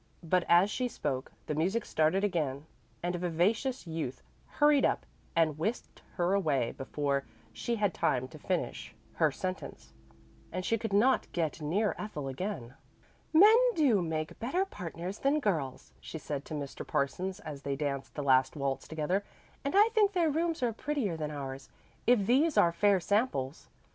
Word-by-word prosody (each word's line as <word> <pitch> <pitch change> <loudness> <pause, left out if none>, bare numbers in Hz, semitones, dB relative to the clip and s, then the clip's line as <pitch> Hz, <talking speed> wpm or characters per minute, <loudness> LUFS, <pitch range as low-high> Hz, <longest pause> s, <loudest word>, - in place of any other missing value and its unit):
But 175 +1 +2
as 175 +4 +6
she 250 +2 0
spoke 135 - -3
the - - -2
music 190 +9 0
started 160 +5 +2
again 155 -8 -1 0.4
and 175 0 0
a - - -3
vivacious 190 +10 0
youth 160 -6 -4 0.3
hurried 295 -2 +5
up - - +1 0.3
and 155 -3 +2
whisked 215 +9 -3
her 175 0 +1
away 145 -11 +1
before 140 0 -2 0.3
she 235 - -2
had 205 -5 +1
time 130 0 0
to - - -12
finish - - -3 0.2
her - - +4
sentence; 65 - -6 0.6
and 185 0 -3
she 230 +2 +1
could 225 -1 -3
not 225 +7 +3
get 160 -2 -1
near 195 +8 +1
Ethel 150 -10 -5
again. 135 - -4 0.6
"Men 405 +8 +8 0.2
do 260 - +4
make 155 -2 -3
better 345 +12 0
partners 180 - -6
than 280 +3 +2
girls," 155 - -2
she - - -7
said 145 -2 -5
to 155 - -6
Mr. 140 -2 -5
Parsons 185 +8 -2
as 150 -8 -8
they 140 -1 -2
danced 140 -1 -3
the 145 - -3
last 130 0 +4
waltz 140 -2 -2
together. 160 +6 -1 0.4
"And 280 +6 -2
I 425 +2 +7
think 425 -3 +3
their 335 -4 +2
rooms 325 -1 0
are 235 -2 +1
prettier 240 - -2
than 155 -2 -3
ours, 135 -2 -6 0.4
if 235 -5 +5
these 285 +7 +3
are 170 - +6
fair 200 +2 +4
samples. 180 - -1
175 Hz, 170 wpm, -31 LUFS, 145-230 Hz, 0.6 s, Men